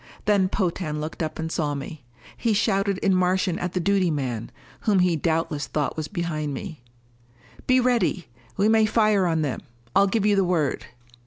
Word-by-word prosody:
Then 200 -3 +3
Potan 175 -6 -2
looked 155 +2 -5
up 155 -1 -3
and 160 0 -4
saw 150 -3 -1
me. 140 +1 -7 0.3
He 230 -2 0
shouted 200 -2 +1
in 195 - +3
Martian 185 0 +1
at 180 0 -3
the 185 - 0
duty 190 0 +2
man, 125 -7 -3 0.3
whom 210 -3 +2
he 180 -2 +3
doubtless 160 -1 -1
thought 150 -2 -2
was 155 -1 -4
behind 155 -6 -3
me: 145 0 -7 0.9
"Be 255 0 +5
ready! 230 - +1 0.3
We 200 +2 +3
may 220 0 +4
fire 215 -4 +3
on 160 -2 +1
them. 140 -4 -3 0.3
I'll 200 - +5
give 210 +1 0
you 205 -1 +4
the 195 - +3
word." 170 -6 0
180 Hz, 180 wpm, -24 LUFS, 155-200 Hz, 0.9 s, Be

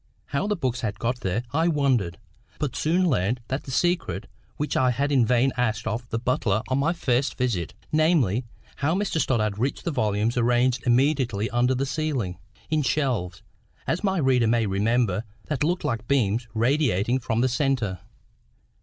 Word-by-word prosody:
How 145 +8 -1
the 210 - +1
books 130 -7 -2
had 105 -3 -3
got 120 +2 -1
there 100 +2 -1
I 160 +3 +2
wondered; 130 - +1 0.4
but 145 -5 -3
soon 180 +4 +2
learned 120 - +1
the 135 +1 -3
secret 150 - 0 0.3
which 150 - -2
I 130 -1 +3
had 140 +4 0
in 130 -5 +3
vain 125 +2 +3
asked 110 -3 -1
of 115 +2 -3
the 115 - -1
butler 115 -3 0
on 130 +1 +1
my 155 +4 +2
first 140 -6 0
visit—namely, 125 - +1 0.3
how 155 +5 +1
Mr 190 -5 0
Stoddart 110 -5 0
reached 135 +4 -1
the 170 - -1
volumes 110 -2 0
arranged 120 +2 +2
immediately 120 -4 +2
under 125 +2 +2
the 135 +2 0
ceiling, 130 - -2 0.3
in 155 -1 +2
shelves, 125 -11 -1 0.4
as 170 - -1
my 195 -1 +1
reader 130 -6 +3
may 115 0 +2
remember, 105 +1 +1 0.2
that 150 -2 -1
looked 175 +4 0
like 120 -6 -2
beams 115 -3 +1
radiating 120 -2 +2
from 115 -2 -1
the 130 - +3
centre. 120 - 0
125 Hz, 165 wpm, -25 LUFS, 110-145 Hz, 0.4 s, I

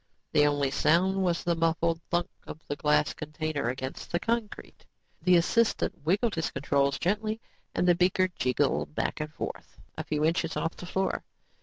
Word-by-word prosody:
The 145 0 +5
only 145 -2 +1
sound 180 +7 +3
was 175 -2 +1
the 170 - +2
muffled 165 0 +1
thunk 175 0 +1 0.2
of 155 - -7
the 145 - -2
glass 150 +1 +2
container 155 -3 -3
against 130 +2 -5
the 170 - +1
concrete. 230 +1 -3 0.4
The 180 -1 +5
assistant 220 -1 +1
wiggled 200 +8 +1
his 165 -1 -1
controls 140 0 +1
gently 215 +4 -1 0.4
and 180 - +2
the 175 - +7
beaker 185 +2 +2
jiggled 145 -1 0
back - - -1
and 150 0 -4
forth, 150 - -7 0.2
a 160 - -4
few 150 0 0
inches 165 0 0
off 165 - -2
the 180 - -9
floor. 190 +1 -1
165 Hz, 170 wpm, -28 LUFS, 150-180 Hz, 0.4 s, the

